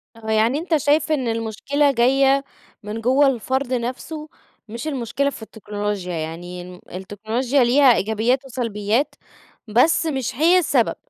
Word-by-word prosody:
آه، 220 -1 -6
يعني 225 +6 +2
أنت 330 -1 +1
شايف 300 +2 +1
إن 270 -5 0
المشكلة 230 +6 0
جاية 270 +2 +3 0.4
من 215 +2 -5
جوّه 265 +4 +4
الفرد 260 +1 -1
نفسه 270 +6 -4 0.4
مش 235 +7 -6
المشكلة 275 0 -1
في 270 - -10
التكنولوجيا، 205 -4 -5
يعني 170 +2 -5
الم 180 0 -11
التكنولوجيا 220 +8 -1
ليها 255 +1 +5
إيجابيات 220 +7 0
وسلبيات 230 0 -1 0.5
بس 250 +10 +3
مش 265 -6 -2
هي 330 +7 +4
السبب. 275 -8 +1
245 Hz, 135 wpm, -21 LUFS, 215-280 Hz, 0.5 s, ليها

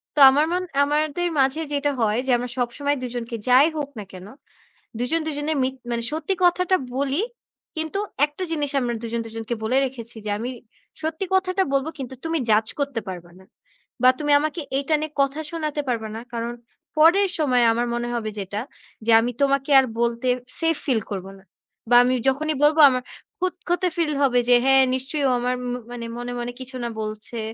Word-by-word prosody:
তো 295 - 0
আমার 290 +3 +3
মন 360 +1 0 0.2
আমাদের 305 +4 0
মাঝে 270 +4 +2
যেটা 285 0 +1
হয়, 220 +1 +2
যে 260 - +2
আমরা 245 0 -4
সবসময় 285 +4 -1
দুজনকে 240 -1 -4
যাই 260 +4 +7
হোক 290 -2 -3
না - - -5
কেন, 185 +1 -10 0.7
দুজন 315 +7 0
দুজনে 295 0 -2
মিক 260 +1 0 0.2
মানে 235 0 -1
সত্যি 320 +5 -1
কথাটা 365 +1 +3 0.2
বলি 280 +5 0 0.6
কিন্তু, 315 +5 -2 0.3
একটা 295 +5 -7
জিনিস 295 -3 -1
আমরা 245 -2 -1
দুজন 230 0 -2
দুজনকে 225 +1 -4
বলে 240 +4 +1
রেখেছি 235 -3 -8
যে, - - -3
"আমি 240 +3 -3 0.5
সত্যি 320 +4 -2
কথাটা 375 0 +2
বলব 275 +2 +1
কিন্তু 260 -1 -6
তুমি 325 0 0
জাজ 215 +1 +3
করতে 280 -5 -1
পারবা 175 -1 -8
না। 190 - -17 0.6
বা 255 - +8
তুমি 295 -1 0
আমাকে 310 +2 -2 0.2
এটা 295 +3 +1
নিয়ে 310 -1 -4
কথা 275 +2 0
শোনাতে 305 -3 -2
পারবা 220 -3 -2
না, 225 - -5
কারণ 235 +1 -3 0.4
পরের 365 +6 +5
সময় 255 -5 +3
আমার 240 +1 0
মনে 240 0 -2
হবে 220 -2 -2
যেটা, 200 +2 -4 0.4
যে 230 - +3
আমি 245 +2 -1
তোমাকে 275 0 +2
আর 265 - +3 0.2
বলতে 235 +1 0 0.3
সেফ 330 0 +2
ফিল 245 -6 +1
করব 190 -1 -4
না 190 - -20 0.5
বা 245 - +5
আমি 255 +1 +2
যখনই 305 +3 -1
বলব 300 +2 +5
আমা 255 -1 -1 0.4
খুঁতখুতে 365 0 -1
ফিল 315 -3 +1
হবে 250 -2 +4
যে, 245 - +8
হ্যাঁ 270 0 +6
নিশ্চয়ই, 270 +3 -3
ও - - +2
আমার 250 +1 0 0.2
ম - - -2 0.2
মানে 240 -1 -6
মনে, 245 0 -5
মনে 240 0 -4
কিছু 260 +1 -9
না - - -2
বলছে 215 +2 -6
265 Hz, 185 wpm, -23 LUFS, 235-310 Hz, 0.7 s, বা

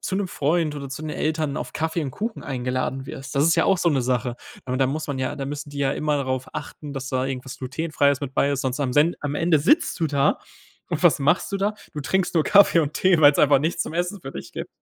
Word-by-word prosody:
zu 190 - -2
'nem 200 -2 -1
Freund 155 +1 0
oder 140 -2 -6
zu 145 +3 -7
den 155 - -4
Eltern 155 -2 -1
auf - - -5
Kaffee 160 +1 -1
und 135 - -3
Kuchen 220 - -5
eingeladen 130 0 -3
wirst, 135 0 -8
das 140 - +4
ist 165 +1 +4
ja - - +3
auch 190 -2 +3
so 170 - +2
'ne 135 -5 +1
Sache. 125 -1 -1 0.3
Aber 130 0 -2
da 135 0 +2
muss 155 +3 -3
man 140 -2 -3
ja 130 +2 -2
da 140 - -4
müssen 145 0 -6
die 145 - -8
ja 140 -1 +1
immer 150 -1 0
darauf 130 -1 -2
achten, 145 0 -7
sonst 135 +1 -1
am 130 -3 0
Sen 155 +5 +3
am 145 -1 -3
Ende 165 -2 +3
sitzt 300 - +2
du 160 - +2
da 140 -1 +2 0.5
und - - -2
was - - +5
machst 155 +7 +1
du - - +1
da? 205 +2 0 0.2
Du 150 - -5
trinkst 180 +5 0
nur 160 - +4
Kaffee 200 -4 +6
und 150 0 -2
Tee, 185 -4 +3
weil's 145 -1 +6
einfach 145 -1 +5
nichts 160 +3 0
zum - - -7
Essen 180 +3 -2
für 135 - -8
dich - - -8
gibt. - - -5
145 Hz, 240 wpm, -23 LUFS, 135-165 Hz, 0.5 s, Kaffee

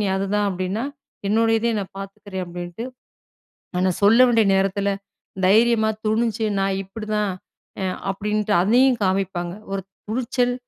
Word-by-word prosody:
நீ 205 - +1
அதுதான் 200 +1 0
அப்பிடின்னா, 185 +5 -2 0.4
என்னுடைய 225 +1 +3
இதையும் 225 -2 +1
நான் 190 - -11
பாத்துக்கிறேன்," 195 -1 -6
அப்பிடின்ட்டு 175 +6 -6 0.9
ஆனா 185 - +3
சொல்ல 225 +5 +6
வேண்டிய 230 -2 +4
நேரத்துல, 195 +1 +1 0.5
தைரியமா 220 +3 +4 0.2
துணிஞ்சு, 225 +1 +1
நான் 195 0 0
இப்பிடிதான் 210 +1 -2 0.5
அ - - 0 0.3
அப்பிடின்ட்டு, 210 +1 -1
அதையும் 250 +5 +4
காமிப்பாங்க. 185 -2 -1 0.2
ஒரு 195 -1 -2 0.3
துணிச்சல் 245 +1 0
210 Hz, 125 wpm, -22 LUFS, 195-225 Hz, 0.9 s, சொல்ல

